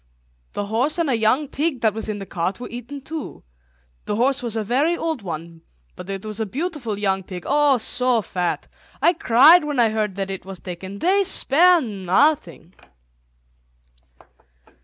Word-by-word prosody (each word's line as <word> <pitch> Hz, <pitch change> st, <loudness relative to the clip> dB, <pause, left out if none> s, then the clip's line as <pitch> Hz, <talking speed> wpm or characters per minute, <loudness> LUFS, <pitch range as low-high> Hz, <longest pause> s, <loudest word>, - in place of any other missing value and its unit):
The 205 Hz, -, -3 dB
horse 240 Hz, -, 0 dB
and 330 Hz, -5 st, +1 dB
a -, -, +2 dB
young 230 Hz, +7 st, +2 dB
pig 290 Hz, -1 st, -2 dB
that 220 Hz, -2 st, +2 dB
was 220 Hz, 0 st, -4 dB
in 210 Hz, -, -3 dB
the 195 Hz, -, -7 dB
cart 185 Hz, +3 st, -3 dB
were 245 Hz, -, -6 dB
eaten 245 Hz, +4 st, -8 dB
too. 310 Hz, +3 st, -7 dB, 0.6 s
The 210 Hz, -, -2 dB
horse 260 Hz, +5 st, +1 dB
was 235 Hz, -2 st, -4 dB
a 220 Hz, -, -1 dB
very 280 Hz, +10 st, +1 dB
old 320 Hz, -6 st, -3 dB
one, 165 Hz, -2 st, -7 dB, 0.3 s
but 180 Hz, -, -10 dB
it 195 Hz, +1 st, -5 dB
was 215 Hz, 0 st, -5 dB
a 220 Hz, -, 0 dB
beautiful 270 Hz, -, -4 dB
young 195 Hz, -2 st, 0 dB
pig, 180 Hz, -1 st, -8 dB
oh, 290 Hz, -2 st, +3 dB
so 245 Hz, 0 st, +1 dB
fat. 180 Hz, -1 st, -3 dB, 0.3 s
I 345 Hz, -, +4 dB
cried 305 Hz, +4 st, +6 dB
when 295 Hz, -3 st, -2 dB
I 230 Hz, -2 st, +4 dB
heard 215 Hz, -3 st, -2 dB
that 195 Hz, 0 st, -3 dB
it 190 Hz, -, -6 dB
was 190 Hz, -1 st, -9 dB
taken. 190 Hz, +2 st, -8 dB
They 385 Hz, -, +2 dB
spare 355 Hz, -1 st, +4 dB
nothing." 195 Hz, -, 0 dB
230 Hz, 175 wpm, -22 LUFS, 195-290 Hz, 0.6 s, cried